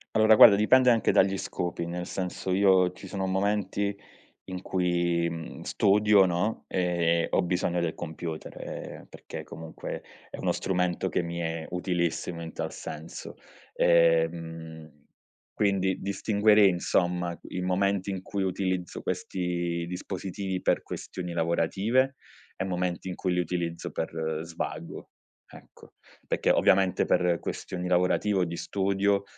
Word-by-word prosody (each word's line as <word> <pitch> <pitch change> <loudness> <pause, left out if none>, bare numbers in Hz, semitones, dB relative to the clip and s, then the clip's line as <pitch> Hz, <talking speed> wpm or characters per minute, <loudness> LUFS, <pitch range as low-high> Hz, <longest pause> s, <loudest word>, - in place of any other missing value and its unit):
Allora, 110 0 +6
guarda, 105 -1 +9
dipende 125 +5 +5
anche 115 -3 +3
dagli 95 0 +3
scopi, 85 -2 -3
nel 90 +1 -4
senso: 95 0 -4
io 95 -1 +4
ci 95 - -11
sono 95 0 -3
momenti 100 +1 0 0.5
in 95 0 -6
cui, 85 -2 +1
mhmm, 85 -1 -7
studio, 105 0 +4
no, 90 +5 -1
ehm, 85 -2 +1
ho - - +2
bisogno 90 0 0
del 85 -2 -1
computer, 80 -1 -6
ehm, - - -7
perché - - -9
comunque 80 -1 -7 0.3
è - - -7
uno - - +1
strumento 90 0 -1
che - - 0
mi 85 0 -5
è 80 -1 -3
utilissimo 90 -1 -2
in 80 -1 -7
tal - - -4
senso, 80 +1 -8 0.4
ehm, 80 -1 +1 0.6
quindi 95 -2 +1
distinguerei, 105 +1 +4
insomma, 90 -1 0
i 90 - -5
momenti 95 +1 0
in 95 -1 -4
cui 100 0 -3
utilizzo 95 -1 -2
questi 85 -2 -2
dispositivi 95 +1 -4
per - - +2
questioni 90 -2 -6
lavorative 95 +11 +1 0.4
e - - -3
momenti 90 0 -2
in 90 - -4
cui 90 -2 -1
li 90 - +1
utilizzo 85 0 -3
per 80 -1 -3
svago, 80 0 -6 0.4
ecco, - - -16 0.3
perché - - 0
ovviamente 95 -1 +4
per 90 -1 +2
questioni 90 -1 -5
lavorative 90 +3 +2
o 90 - +3
di 85 0 -5
studio, 100 +1 0
90 Hz, 135 wpm, -28 LUFS, 85-95 Hz, 0.6 s, guarda